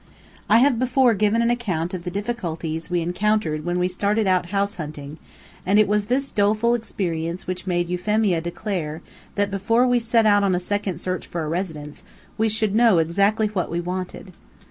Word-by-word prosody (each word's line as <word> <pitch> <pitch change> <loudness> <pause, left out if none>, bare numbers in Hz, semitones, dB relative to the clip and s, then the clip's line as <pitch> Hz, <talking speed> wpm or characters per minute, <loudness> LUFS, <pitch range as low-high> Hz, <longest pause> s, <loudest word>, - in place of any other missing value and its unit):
I 220 - +6
have 250 -1 +4
before 255 -1 +3
given 215 +3 +2
an 235 - +2
account 185 -8 -2
of 180 -1 -5
the - - -2
difficulties 175 -6 -4
we 175 -1 0
encountered 180 -3 0
when 175 +1 -1
we 180 0 +1
started 205 +4 0
out 185 -2 +2
house 200 +2 -1
hunting, 150 -2 -7 0.4
and 195 +3 +2
it 215 - +5
was 210 0 +1
this 265 +5 -1
doleful 215 +3 +2
experience 175 -7 -3
which 185 +1 -5
made 175 -1 0
Euphemia 180 0 +1
declare 170 -3 -4 0.3
that 205 0 0
before 225 +5 +2
we 245 -1 +3
set 230 -1 +2
out 205 -1 +4
on 190 -2 +2
a - - 0
second 200 -1 -2
search 185 0 -4
for 170 -2 -4
a - - -4
residence, 155 -3 -4 0.3
we 220 +1 +1
should 215 -1 0
know 225 -4 +5
exactly 200 +7 +2
what 205 -4 -2
we 170 - -2
wanted. 185 +1 -5
195 Hz, 190 wpm, -23 LUFS, 175-215 Hz, 0.4 s, I